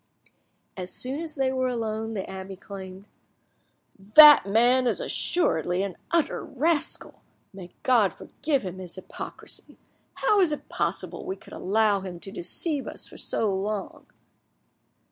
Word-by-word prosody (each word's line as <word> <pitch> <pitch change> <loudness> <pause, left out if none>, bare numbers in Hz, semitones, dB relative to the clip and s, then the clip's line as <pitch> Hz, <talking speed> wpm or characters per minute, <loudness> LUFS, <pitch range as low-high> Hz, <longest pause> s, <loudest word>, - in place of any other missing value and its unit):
As 185 -1 -5
soon 265 +9 -3
as 325 -1 -4
they 265 -2 +1
were 260 0 0
alone, 225 -2 -3
the 190 - -4
abbe 190 0 -7
exclaimed— 190 0 -10 0.9
"That 285 +5 +8
man 245 +5 +4
is - - 0
assuredly 180 - 0
an 195 -3 -4
utter 335 -2 0
rascal! 310 +3 -1 0.3
May 185 -2 -10
God 230 -7 +4
forgive 280 - -3
him 185 0 -6
his 180 -2 -6
hypocrisy! 185 - -8 0.4
How 420 - +2
is 360 -5 +4
it 295 - -5
possible - - -2
we 380 +1 -4
could - - -15
allow 210 +1 +1
him 185 -2 -8
to 195 - -8
deceive 280 - -2
us - - -1
for - - -12
so 210 -3 0
long?" 200 +1 -4
220 Hz, 145 wpm, -26 LUFS, 190-275 Hz, 0.9 s, That